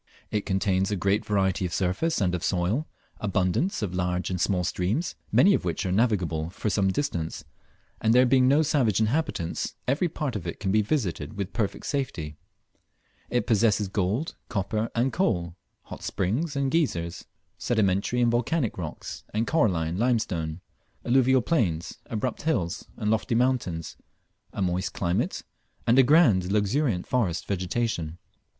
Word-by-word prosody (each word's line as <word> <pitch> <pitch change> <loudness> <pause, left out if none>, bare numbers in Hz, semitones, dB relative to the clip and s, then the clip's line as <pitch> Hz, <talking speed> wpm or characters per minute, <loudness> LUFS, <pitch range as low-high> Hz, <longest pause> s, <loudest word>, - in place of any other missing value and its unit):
It 105 -1 -1
contains 95 -1 +1
a 105 - 0
great 100 +3 +1
variety 95 -2 +1
of 90 - -2
surface 95 - 0
and 90 -4 +1
of 90 - -2
soil, 95 - 0 0.3
abundance 100 - 0
of 95 -3 -2
large 90 0 -1
and 90 -1 -2
small 90 -1 +1
streams, 95 - -1 0.2
many 200 - +6
of - - +1
which 90 +3 -2
are 90 - 0
navigable 90 -7 +1
for 100 +3 -3
some 100 -1 +2
distance, 85 - -2 0.6
and 110 - +3
there 125 +2 +6
being 130 0 +4
no 145 +4 +5
savage 130 -10 +2
inhabitants, 110 - -1
every 145 +7 +1
part 150 -6 -3
of 90 -5 -4
it 85 - -5
can 95 -2 -1
be 110 +2 +4
visited 100 - -2
with 100 -1 -4
perfect 105 -5 -2
safety. 130 - -3 0.9
It 125 - 0
possesses 105 -2 +2
gold, 105 - -1 0.2
copper, 110 0 -1
and 125 +3 +1
coal, 85 - 0 0.3
hot - - -9
springs 120 - -1
and 140 -1 0
geysers, 85 - -1 0.3
sedimentary 105 +1 +1
and 120 -1 +4
volcanic 120 - 0
rocks 80 -4 -6
and 110 +2 +1
coralline 90 - +1
limestone, 95 -9 0 0.4
alluvial 130 +1 +4
plains, 90 - 0
abrupt 115 +2 -3
hills 100 - -1
and 105 - 0
lofty 110 +1 0
mountains, 115 - 0 0.5
a 100 - -2
moist 90 +1 -1
climate, 85 -1 -1 0.4
and 120 +3 +5
a - - +10
grand 130 - +5
and 90 +1 -5
luxuriant 105 -1 +1
forest 100 -10 0
vegetation. 90 -3 -2
105 Hz, 155 wpm, -26 LUFS, 90-125 Hz, 0.9 s, a